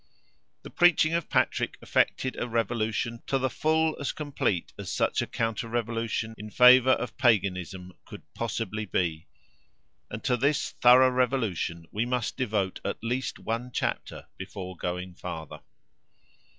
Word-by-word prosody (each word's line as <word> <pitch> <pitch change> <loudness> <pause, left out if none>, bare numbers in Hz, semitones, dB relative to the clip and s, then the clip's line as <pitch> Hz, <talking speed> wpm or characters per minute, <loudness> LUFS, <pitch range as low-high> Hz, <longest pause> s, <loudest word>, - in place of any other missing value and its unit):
The - - -10
preaching 170 -2 +4
of 170 -1 -1
Patrick - - 0
effected 130 - 0
a - - -3
revolution 115 0 -1
to 135 - +1
the 130 -1 -1
full 160 +2 +1
as 140 - -1
complete 140 - -2
as - - -6
such - - +1
a - - -3
counter 115 +1 -2
revolution 115 -1 -2
in 105 +1 -7
favour 125 +2 +7
of 125 - -3
Paganism 95 -6 +1
could - - -11
possibly 110 -2 -3
be, 85 -4 -2 0.8
and 105 - -7
to 125 - +2
this 140 +4 +1
thorough 130 +1 +6
revolution 115 -10 -1
we 110 +3 -1
must 125 -2 -1
devote 105 -6 -1
at - - -4
least 125 +3 -2
one 115 +2 -3
chapter - - -3
before 95 -1 -7
going 90 +1 -4
farther. 80 -3 -7
115 Hz, 140 wpm, -27 LUFS, 100-130 Hz, 0.8 s, favour